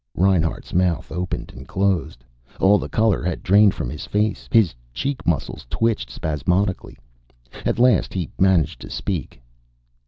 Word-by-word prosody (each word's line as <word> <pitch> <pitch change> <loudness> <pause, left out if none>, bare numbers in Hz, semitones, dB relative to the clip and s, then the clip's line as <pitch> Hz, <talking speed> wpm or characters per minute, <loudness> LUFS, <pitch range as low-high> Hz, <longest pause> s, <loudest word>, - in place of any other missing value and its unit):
Reinhart's 90 -3 +1
mouth 90 -1 +1
opened 90 +2 -4
and - - -11
closed. 85 -10 -1 0.3
All 100 +2 +5
the - - -5
color 110 -3 +2
had 90 - -3
drained 100 +1 +5
from - - -3
his 75 - -7
face. 105 +1 -1
His 110 - +4 0.2
cheek 140 - -3
muscles 75 -6 -2
twitched 115 - 0
spasmodically. 90 +8 -1 0.7
At - - 0
last 120 -4 +3
he 90 -6 -3
managed 90 -5 +2
to - - -9
speak. 80 -10 -4
95 Hz, 145 wpm, -22 LUFS, 80-105 Hz, 0.7 s, All